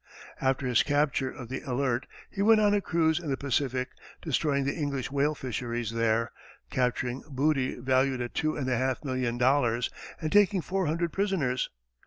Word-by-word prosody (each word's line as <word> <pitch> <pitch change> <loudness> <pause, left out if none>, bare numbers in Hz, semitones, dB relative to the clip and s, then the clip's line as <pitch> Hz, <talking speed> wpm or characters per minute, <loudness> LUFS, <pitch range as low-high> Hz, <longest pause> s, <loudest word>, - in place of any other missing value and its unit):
After 135 0 +1
his 125 -3 +4
capture 145 -2 +1
of 130 -4 -9
the 130 - -4
Alert, 130 -2 -1 0.2
he 195 - -3
went 220 +1 +6
on 205 -1 +4
a 205 - +2
cruise 160 -3 +1
in 165 -4 -6
the 135 - 0
Pacific, 130 -2 -1 0.3
destroying 145 -2 +1
the 140 - 0
English 140 -5 -3
whale 145 +2 +1
fisheries 120 -3 -3
there, 115 0 +1 0.4
capturing 125 0 -1
booty 135 -1 +1
valued 130 +1 +2
at 120 -1 -4
two 155 0 0
and 135 -3 -3
a 130 - +1
half 130 +2 -1
million 130 -3 -1
dollars, 125 -2 +2 0.3
and 155 -1 -3
taking 205 -2 +4
four 190 0 -1
hundred 165 +1 -1
prisoners. 170 -11 0
135 Hz, 175 wpm, -28 LUFS, 125-155 Hz, 0.4 s, went